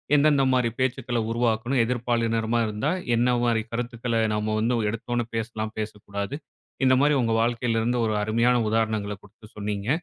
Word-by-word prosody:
எந்தெந்த 145 -1 +4
மாரி 125 -2 +2
பேச்சுக்கள 125 -1 -1
உருவாக்கணும். 120 +2 +1
எதிர்ப்பாலினரமா 115 -1 0
இருந்தா 110 +8 -1 0.2
என்ன 120 +2 +2
மாரி 115 -2 +2
கருத்துக்கள 115 -1 -2
நம்ம 105 0 -1
வந்து 115 +3 +1
ஒரு 110 - 0
எடுத்த 115 +2 -5
ஒன்ன 120 -1 0
பேசலாம், 110 -1 -3
பேசக்கூடாது. 105 +3 -5 0.5
இந்த 130 - +5
மாரி 145 +1 +4
உங்க 115 -1 +1
வாழ்க்கையிலிருந்து 115 0 0
ஒரு 110 - 0
அருமையான 115 +3 +2
உதாரணங்களைக் 110 -3 -1
குடுத்து 105 +1 -16
சொன்னீங்க. 105 +1 -3
115 Hz, 150 wpm, -25 LUFS, 110-120 Hz, 0.5 s, இந்த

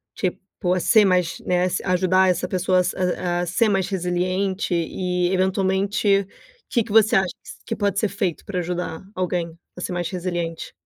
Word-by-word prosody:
tipo, 185 -1 -2
a 185 - +1
ser 215 +4 +5
mais, 180 -3 +1
né, 180 0 +1
a - - +1
se 185 - -2
a 185 - -1
ajudar, 185 +1 +3
essa 180 0 0
pessoa 185 0 +1 0.6
a - - -1
ser 180 +7 +2
mais 195 -2 +1
resiliente, 185 +1 -1
e 180 +1 0
eventualmente 195 +1 +1 0.4
que, 235 - +2
que 220 - -6
você 220 -2 +5
acha 190 -1 +1 0.3
que - - -3
pode 200 -2 0
ser 215 - +2
feito, 190 -4 -3
pra 190 -3 -3
ajudar 175 -1 -4
alguém 175 -3 -2 0.2
a 180 - -8
ser - - -3
mais 175 -1 -2
resiliente? 175 -2 -4
185 Hz, 175 wpm, -23 LUFS, 180-195 Hz, 0.6 s, ser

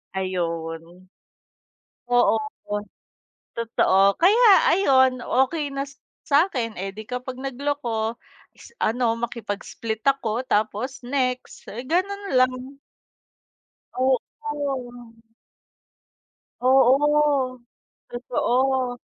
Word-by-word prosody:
Ayun, 170 -1 -4 1.0
oo, 245 -2 +4 1.2
totoo. 200 -4 +3
Kaya 420 +8 +5 0.3
ayun, 260 -8 +4
okey 285 +3 0
na 275 - -1
sa 280 - -18 0.2
sa'kin, 280 - +1
eh, 195 +1 -5
di 215 - -7
kapag 250 +3 -6
nagloko 255 -4 -3 0.4
is - - -15
ano 230 0 0
makipag-split 225 -1 -5
ako 255 -3 0
tapos, 220 +5 -1
next, 255 0 -3
eh, 235 +4 -7
gano'n 390 +8 -1
lang. 255 +2 0 1.2
Oo. 260 0 +3 2.4
Oo, 270 0 +3 0.5
totoo. 250 +1 0
255 Hz, 80 wpm, -23 LUFS, 220-275 Hz, 2.4 s, Kaya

